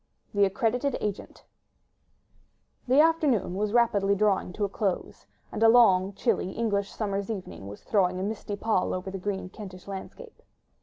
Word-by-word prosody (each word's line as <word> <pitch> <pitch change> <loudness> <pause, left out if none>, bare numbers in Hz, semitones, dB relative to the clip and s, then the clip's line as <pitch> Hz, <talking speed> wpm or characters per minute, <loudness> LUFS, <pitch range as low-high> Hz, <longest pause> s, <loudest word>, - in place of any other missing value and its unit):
THE 205 -1 +4
ACCREDITED 245 +6 0
AGENT 205 -2 -5 1.4
The 260 +3 +4
afternoon 300 - +2
was 205 +2 -1
rapidly 205 -4 +3
drawing 200 -3 +1
to 205 - -1
a - - -1
close; 195 -1 -3 0.2
and - - -5
a 225 - +7
long, 200 -5 +5
chilly 190 -3 -1
English 205 -3 -1
summer's 200 -2 -3
evening 185 - -6
was 100 +1 -10
throwing 185 -3 +1
a - - -2
misty 205 0 -4
pall 200 -3 0
over 185 +1 -5
the 195 - -5
green 190 -1 -3
Kentish 185 -2 -10
landscape. 320 - -9
200 Hz, 155 wpm, -27 LUFS, 190-225 Hz, 1.4 s, a